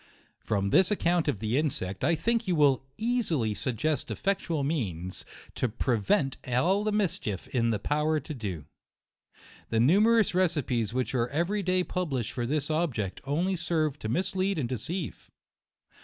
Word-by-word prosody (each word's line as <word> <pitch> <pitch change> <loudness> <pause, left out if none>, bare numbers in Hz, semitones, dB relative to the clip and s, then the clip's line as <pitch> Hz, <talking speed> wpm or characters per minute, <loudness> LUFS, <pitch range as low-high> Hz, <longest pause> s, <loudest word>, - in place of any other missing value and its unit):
From 100 -1 -1
this 185 - +5
account 175 -5 +1
of 140 -9 0
the 115 +6 +1
insect, 100 -11 -2
I 165 +5 +3
think 230 +7 0
you 180 - +2
will 140 -4 +4
easily 200 - +1
suggest 130 +8 -1
effectual 185 -6 -1
means 95 - -3 0.3
to 130 - -1
prevent 120 +4 +1
all 170 +12 +2
the 215 - 0
mischief 180 - -1
in 115 -2 +1
their 110 - +1
power 150 +7 +1
to 155 +2 -7
do. 95 - -5 1.0
The 110 - +1
numerous 210 - +4
recipes 145 - +1
which 130 +2 -1
are 120 -2 +1
every 175 +9 0
day 185 -1 +1
pub 180 -1 -2
lished 120 -3 -1
for 120 -2 -3
this 150 +2 -1
object, 130 - -1
only 170 +7 0
serve 160 -4 -1
to 110 - -4
mislead 190 - 0
and 135 -6 -1
deceive. 150 - -5
150 Hz, 155 wpm, -28 LUFS, 115-180 Hz, 1.0 s, this